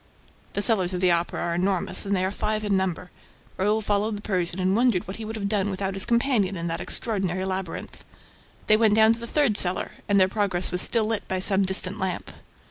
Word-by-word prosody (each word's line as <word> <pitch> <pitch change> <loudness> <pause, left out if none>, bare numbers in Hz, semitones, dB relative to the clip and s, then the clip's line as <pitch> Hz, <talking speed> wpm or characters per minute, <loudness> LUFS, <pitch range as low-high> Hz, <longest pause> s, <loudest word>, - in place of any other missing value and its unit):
The 205 - -1
cellars 190 -6 +1
of - - -2
the 180 -1 +3
Opera 170 0 0
are 170 - -1
enormous 185 +2 0
and 200 - +1
they 185 - 0
are 190 - -1
five 215 +1 -2
in 205 -2 +1
number. 180 -1 -2 0.4
Raoul 210 +3 0
followed 205 +1 0
the - - -9
Persian 180 -3 -2
and 185 +1 +1
wondered 235 -6 +2
what 190 - -6
he 220 - -6
would 220 +1 -6
have 205 -2 -3
done 205 -1 0
without 195 0 -3
his 195 +1 +4
companion 235 -6 +1
in 170 - -4
that 165 -1 -2
extraordinary 190 -5 -2
labyrinth. 190 -2 -5 0.6
They 215 - +4
went 215 -2 +3
down 220 +1 +5
to 230 - -7
the 235 - -7
third 260 -6 +1
cellar; 180 0 +2 0.2
and 200 -1 +4
their 185 - +5
progress 190 -3 -1
was 180 +1 +1
still 230 -2 +2
lit 220 -1 -2
by 190 - -2
some 195 +1 +2
distant 190 +1 -1
lamp. 190 -1 -3
195 Hz, 225 wpm, -25 LUFS, 185-215 Hz, 0.6 s, down